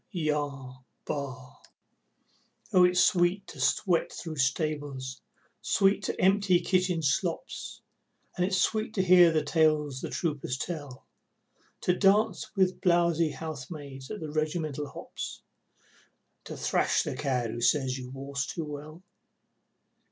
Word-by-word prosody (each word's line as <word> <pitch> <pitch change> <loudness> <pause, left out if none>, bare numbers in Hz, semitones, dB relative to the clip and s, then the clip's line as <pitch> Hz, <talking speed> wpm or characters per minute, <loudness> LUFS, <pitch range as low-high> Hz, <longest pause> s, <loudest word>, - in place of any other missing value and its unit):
Yah! 145 -7 -2 0.3
Bah! 130 -3 -5 1.2
Oh, 180 - +7
it's 180 0 +4
sweet 180 +2 +2
to 145 - -11
sweat 165 +6 +1
through 160 -3 -7
stables, 140 -2 -2 0.4
sweet 195 0 +2
to - - -3
empty 190 -1 +4
kitchen 180 -1 +1
slops, 140 - -2 0.5
And 180 - 0
it's 190 +1 +1
sweet 215 +2 0
to 190 - +2
hear 180 -2 +7
the 155 -2 +1
tales 150 -3 +2
the - - -4
troopers 145 -6 -2
tell, 145 -5 -6 0.8
To 180 - +2
dance 210 +3 +2
with 185 -2 +1
blowzy 170 -3 +3
housemaids 140 -3 -7
at 210 - -6
the 155 -2 -5
regimental 155 -2 -2
hops - - -7 1.1
And - - -6
thrash - - +1
the - - -4
cad 125 -4 -1
who 120 - -5
says 130 0 +2
you 125 -1 -8
waltz 140 +1 -4
too 165 - -4
well. 150 +3 -9
155 Hz, 130 wpm, -28 LUFS, 140-180 Hz, 1.2 s, Oh